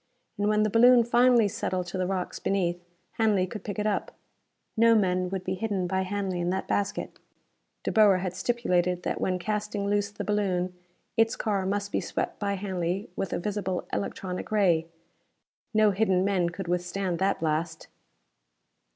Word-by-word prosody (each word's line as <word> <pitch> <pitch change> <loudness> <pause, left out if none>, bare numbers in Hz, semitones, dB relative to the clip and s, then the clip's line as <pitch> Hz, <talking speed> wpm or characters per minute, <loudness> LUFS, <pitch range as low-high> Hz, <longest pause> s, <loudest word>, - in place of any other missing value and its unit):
And 205 - +1
when 215 0 +3
the 215 - 0
balloon 240 +2 +7
finally 240 -1 +4
settled 185 -2 -2
to 180 - -4
the 185 - 0
rocks 185 -1 -3
beneath, 175 -3 -1 0.4
Hanley 210 -4 +3
could 205 +3 -8
pick 205 - -5
it 210 - -1
up. 210 -1 -1 0.6
No 230 +1 +5
men 185 -3 +1
would 190 -1 -4
be 185 - -2
hidden 195 -1 -2
by 190 +1 0
Hanley 190 -1 -2
in 175 - 0
that 190 +1 -2
basket. 200 -1 -2 0.6
De - - -1
Boer 210 -3 +5
had 185 -1 -3
stipulated 180 -6 0
that - - -2
when 185 -1 +1
casting 210 +2 -2
loose 205 0 +1
the 205 - -6
balloon, 185 -3 0 0.4
its 225 0 +3
car 200 -3 -1
must 200 +1 -2
be - - 0
swept - - -3
by 200 -1 -1
Hanley 185 0 -3
with 195 -3 -3
a - - 0
visible 190 -1 -3
electronic 180 - -4
ray. 175 -6 +3 0.8
No 215 -1 +4
hidden 190 -2 +2
men 185 -4 +1
could 175 +2 -7
withstand 180 +1 -1
that 195 +1 +1
blast! 160 +1 -2
195 Hz, 170 wpm, -27 LUFS, 180-210 Hz, 0.8 s, balloon